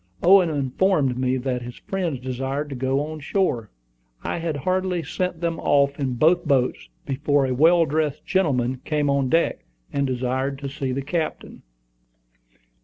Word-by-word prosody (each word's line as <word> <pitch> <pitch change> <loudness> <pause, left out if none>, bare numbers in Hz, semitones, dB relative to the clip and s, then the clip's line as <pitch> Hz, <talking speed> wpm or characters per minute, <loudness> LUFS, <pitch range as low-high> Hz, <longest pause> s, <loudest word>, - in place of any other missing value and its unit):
Owen 185 -1 +6
informed 145 0 +1
me 130 0 +1
that 125 -1 -2
his 120 0 -8
friends 175 -8 -3
desired 135 +3 -3
to 140 - -5
go 130 +2 0
on 155 0 -7
shore. 140 - -1 0.5
I - - -2
had 165 -2 -2
hardly 185 +3 -1
sent 180 +3 -3
them 165 -1 -1
off 140 0 +2
in 130 -3 -1
both 170 +7 +3
boats, 130 - 0 0.2
before 145 0 +1
a 130 - -1
well 165 +5 +5
dressed 150 0 -1
gentleman 130 -9 0
came 150 -2 0
on 140 -2 +1
deck, 165 +4 +1 0.3
and 140 -1 +1
desired 130 +2 -1
to 140 0 -5
see 135 -2 -3
the 135 +2 -2
captain. 160 +3 -4
140 Hz, 160 wpm, -23 LUFS, 130-165 Hz, 0.5 s, Owen